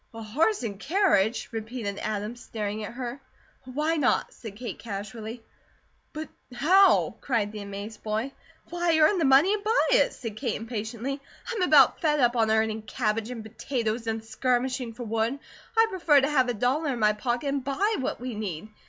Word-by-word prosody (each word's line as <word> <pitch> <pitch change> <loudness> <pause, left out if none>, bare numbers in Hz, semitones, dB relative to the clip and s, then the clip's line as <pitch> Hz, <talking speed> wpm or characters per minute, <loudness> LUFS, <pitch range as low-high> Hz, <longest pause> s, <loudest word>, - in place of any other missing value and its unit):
"A 225 - -6
horse 305 - +1
and 200 -4 -4
carriage?" 240 - +2
repeated 220 -2 -4
Adam, 215 +1 -3
staring 215 -3 -5
at 215 - -6
her. 250 +2 -5 0.4
"Why 300 +6 -1
not?" 275 -4 +1
said 220 -4 -9
Kate, 235 +2 -6
casually. 220 +2 -6 0.7
"But 310 +1 -6 0.3
how?" 375 +9 +4
cried 225 -6 0
the 215 -1 -7
amazed 200 +2 -7
boy. 220 +5 -2 0.4
"Why, 345 -2 +2
earn 320 +5 +4
the 325 - +2
money, 275 +9 +6
and 420 -1 -2
buy 445 +3 +2
it!" - - +4
said 225 -4 -7
Kate, 240 -4 -1
impatiently. 230 +4 -4 0.3
"I'm 450 -5 -2
about 360 - +5
fed 300 -3 +2
up 245 -2 +3
on 225 -2 +2
earning 220 0 +1
cabbage, 220 0 -2
and 240 -3 -6
potatoes, 225 0 -3
and 225 0 -2
skirmishing 250 +2 -1
for 240 +2 -7
wood. 225 +3 -1 0.4
I'd 450 0 +5
prefer 335 -6 +4
to 275 +2 +1
have 260 -4 +3
a 245 - -1
dollar 270 +7 +1
in - - -4
my 210 -1 +4
pocket, 240 +5 -2
and 275 -1 -1
BUY 395 - 0
what 260 - -2
we 250 0 -5
need. 210 -3 -5
240 Hz, 180 wpm, -27 LUFS, 220-280 Hz, 0.7 s, money